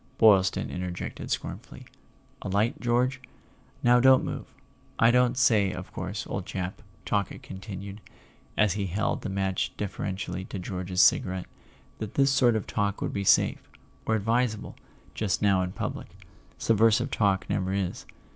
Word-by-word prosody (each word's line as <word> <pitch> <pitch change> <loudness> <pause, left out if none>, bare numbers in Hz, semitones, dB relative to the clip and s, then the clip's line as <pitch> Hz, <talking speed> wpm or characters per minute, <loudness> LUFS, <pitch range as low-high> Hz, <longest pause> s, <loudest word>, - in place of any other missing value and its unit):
Boylston 95 -4 +4
interjected 90 -1 -5
scornfully.) - - -5 0.6
"A - - -5
light, 105 +5 +1
George? 125 +2 +1 0.6
Now 120 0 +6
don't 130 +1 +6
move!—I 115 +1 -2
don't 125 0 +3
say, 110 -7 +4
of 95 +1 -8
course, 95 +3 -4
old 95 -1 -5
chap," 90 0 -4 0.2
Talkett 100 -2 -2
continued, 95 +1 -8 0.6
as 105 -4 +3
he 100 -1 -2
held 100 +5 -1
the - - -4
match 95 -1 -1
deferentially 95 -2 -4
to 100 - -6
George's 90 0 -1
cigarette, 95 -1 +2 0.5
"that 110 -2 -6
this 135 0 +4
sort 125 -3 +4
of 110 - -1
talk 100 -2 -1
would - - -3
be 100 - -2
safe—or 110 +3 0
advisable—just 110 -2 -2
now 100 -3 +3
in 90 0 -2
public; - - -5 0.5
subversive 115 +4 +3
talk 100 -3 +1
never 95 0 -1
is. 95 -2 -3
100 Hz, 135 wpm, -27 LUFS, 95-115 Hz, 0.6 s, Now